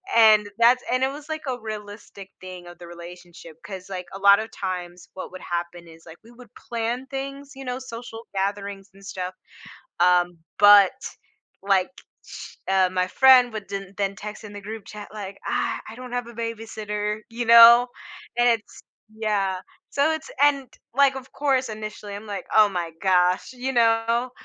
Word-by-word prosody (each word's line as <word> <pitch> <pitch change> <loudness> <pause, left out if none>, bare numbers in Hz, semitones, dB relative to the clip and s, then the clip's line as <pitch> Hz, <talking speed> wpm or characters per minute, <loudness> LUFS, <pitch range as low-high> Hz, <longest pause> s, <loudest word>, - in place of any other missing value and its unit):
and 215 -2 +6
that's 245 +2 +5
and 255 +1 +1
it 265 - +4
was 290 +1 -10
like 315 0 -3
a 250 -1 -2
realistic 205 -2 -9
thing 185 -1 -10
of 175 - -12
the 175 - -12
relationship. 170 -1 -12
'Cause, 190 -2 -8
like, 185 -2 -5
a 195 - -7
lot 200 +1 +6
of 220 - -5
times 180 -3 -6
what 185 - -8
would 185 - -10
happen 175 0 -5
is 165 0 -16
like 165 0 -12
we 230 - -17
would 240 -2 -16
plan 235 +2 -4
things, 275 +1 -6
you 270 0 -9
know, 250 0 -3
social 230 -2 -9
gatherings 200 0 -3
and 195 0 -18
stuff. 185 -1 -5 0.7
Um, 175 -1 +3 0.2
but 205 0 +8 0.7
like, 195 0 +2 0.8
uh, 190 -1 +3
my 185 0 +1
friend 255 +2 +6
would 210 -2 -6
den 195 -1 -6
then 200 -1 -2
text 210 +2 -8
in 210 - -9
the 205 - -8
group 215 +1 -8
chat 210 -1 -9
like, 200 -2 -7
"Ah, - - -1
I 220 - -9
don't 250 0 -9
have 245 -1 -2
a 235 - -11
babysitter," 215 -2 -4
you 235 +1 -3
know, 235 +1 +9 0.5
and 240 0 +5
it's 225 -2 -3 0.3
yeah, 200 -4 -1 0.3
so 285 +3 +2
it's 315 0 -5
and 280 -2 +3 0.3
like, 275 0 +4
of 260 -1 -9
course, 265 -3 0
initially 215 -1 -7
I'm 205 +2 -8
like, 205 -2 -5
"Oh 215 -1 +7
my 175 -4 -3
gosh," 180 +2 +2
you 260 +1 -4
know, 230 +1 +2
210 Hz, 180 wpm, -24 LUFS, 190-240 Hz, 0.8 s, know